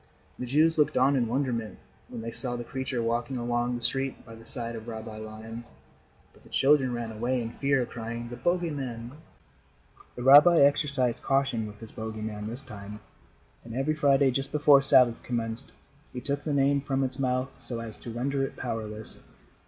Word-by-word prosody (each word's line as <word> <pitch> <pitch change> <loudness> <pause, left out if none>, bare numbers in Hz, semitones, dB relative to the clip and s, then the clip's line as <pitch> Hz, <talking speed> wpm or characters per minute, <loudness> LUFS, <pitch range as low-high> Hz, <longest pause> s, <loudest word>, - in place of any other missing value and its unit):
The 125 - -4
Jews 155 +5 +3
looked 150 0 +2
on 135 +2 +4
in 120 -3 +1
wonderment 120 -4 -2 0.3
when - - -7
they 115 +1 -5
saw 120 +1 -1
the 120 - -5
creature 130 -1 -3
walking 120 +3 -1
along 120 0 -1
the 120 - -5
street 135 +3 -1
by 115 - -11
the 115 0 -14
side 115 -1 -5
of 110 0 -9
Rabbi 110 -1 -7
Lion, 110 +2 -8 0.7
but - - -22
the - - -19
children 135 -2 +3
ran 120 -2 -4
away 120 +4 -1
in 115 -1 -4
fear, 135 -1 +1
crying: 115 0 -6
"The 120 - -6
bogey 175 +6 0
man." 120 -4 -5 1.0
The 120 - -6
rabbi 145 +6 +8
exercised 140 -3 +2
caution 135 -5 0
with 105 +1 -12
his 115 - -8
bogey 110 -1 -6
man 105 -1 -5
this 120 +5 -4
time, 105 -4 -9 0.6
and 115 0 -9
every 135 +4 0
Friday, 140 -3 +3
just 135 +2 -2
before 145 -2 +5
Sabbath 130 -4 +7
commenced, 115 +1 -3 0.4
he 125 - -4
took 140 +2 -2
the 155 - -1
name 140 0 +2
from 135 -1 -1
its 130 +1 -3
mouth 130 0 0
so 120 -2 -6
as 115 -2 -8
to - - -9
render 135 +4 -2
it 135 - -4
powerless. 110 -3 -4
125 Hz, 190 wpm, -27 LUFS, 115-135 Hz, 1.0 s, rabbi